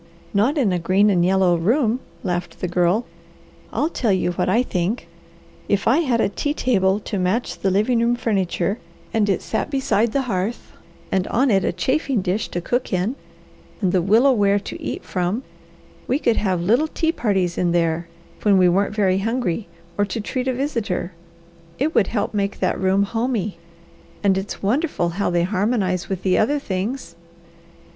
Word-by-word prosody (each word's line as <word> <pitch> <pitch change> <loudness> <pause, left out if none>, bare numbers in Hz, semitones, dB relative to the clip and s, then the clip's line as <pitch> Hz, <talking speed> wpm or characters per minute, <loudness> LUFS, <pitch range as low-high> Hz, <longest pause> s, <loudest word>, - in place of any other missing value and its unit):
"Not 230 +10 +2
in 225 -10 +2
a 180 - 0
green 195 +4 +3
and 175 -3 +3
yellow 185 -1 +3
room," 230 - +1 0.2
laughed 175 -2 -3
the 180 - -2
Girl. 180 +6 +1 0.7
"I'll 310 - 0
tell 230 -5 0
you 185 -2 +1
what 175 - -1
I 230 +6 +3
think. 185 -1 -2 0.6
If 200 -1 +1
I 285 - +5
had 260 -8 +1
a - - +3
tea 290 +9 -2
table 195 -7 +2
to 205 -1 -3
match 185 +7 -1
the 195 - +1
living 215 +6 +2
room 235 +1 +2
furniture, 200 -2 -1 0.3
and 210 -2 +2
it 195 - 0
sat - - -2
beside 235 -5 +1
the 275 +2 0
hearth, 215 0 -3 0.4
and 190 -1 +1
on 255 +2 +2
it 195 -2 +3
a - - +1
chafing 260 - 0
dish 190 +4 -1
to 175 - -3
cook 245 +8 -1
in, 190 +7 0 0.6
and 190 -4 +1
the 185 -1 +2
willow 225 +9 +4
ware 205 -4 +3
to - - -8
eat - - -4
from, 185 +7 -2 0.6
we 260 - +2
could 235 -6 +1
have 185 -4 0
little 240 - +3
tea 320 +1 0
parties 190 - 0
in 175 -1 +1
there, 170 0 0 0.3
when 205 -2 +4
we 185 -1 +5
aren't 195 +4 +1
very 190 -3 +2
hungry 225 -3 -1 0.3
or 205 - +4
to 225 - -4
treat 250 +4 -3
a 260 - +1
visitor. 230 -10 -2 0.7
It 305 +5 0
would 195 - +3
help 220 -2 -2
make 200 -1 -1
that - - -1
room 190 +1 +3
'homey,' 220 -3 -2 0.6
and 195 -2 +4
it's 190 +1 -4
wonderful 240 - +1
how 195 +4 -1
they 175 -1 +1
harmonize 190 -1 0
with 190 -2 -3
the 185 -1 +3
other 285 +7 +2
things." 205 -4 -4
200 Hz, 180 wpm, -21 LUFS, 185-240 Hz, 0.7 s, I